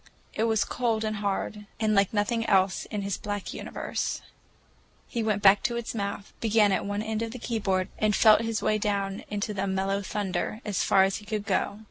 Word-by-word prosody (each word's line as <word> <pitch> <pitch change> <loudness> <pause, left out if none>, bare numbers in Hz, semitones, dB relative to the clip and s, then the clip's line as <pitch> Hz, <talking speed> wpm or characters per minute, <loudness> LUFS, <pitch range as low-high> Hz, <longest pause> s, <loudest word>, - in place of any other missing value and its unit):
It 220 - 0
was 220 -2 +2
cold 230 -3 0
and 215 -1 -2
hard, 205 +1 -3
and 215 -1 +2
like 200 -2 +3
nothing 225 +2 0
else 190 -1 +3
in 205 -2 -4
his 200 -1 -2
black 205 -2 -4
universe. - - -3 0.8
He 235 - -2
went 215 -2 0
back 200 0 +7
to 240 -2 +1
its 235 - -4
mouth, 200 -2 -4
began 215 -2 +3
at 195 - 0
one 205 +1 -2
end 220 0 -2
of 230 - -2
the - - -6
keyboard 200 -6 -1
and 210 -1 +2
felt 215 -1 +6
his 225 -1 -2
way 215 - +2
down 200 -1 -1
into 210 +1 -2
the 200 0 -2
mellow 195 +1 0
thunder, 205 +1 -2
as 205 -3 0
far 190 -1 +5
as 195 0 +1
he 210 - -12
could 210 -1 -2
go. 200 - 0
210 Hz, 205 wpm, -27 LUFS, 200-220 Hz, 0.8 s, back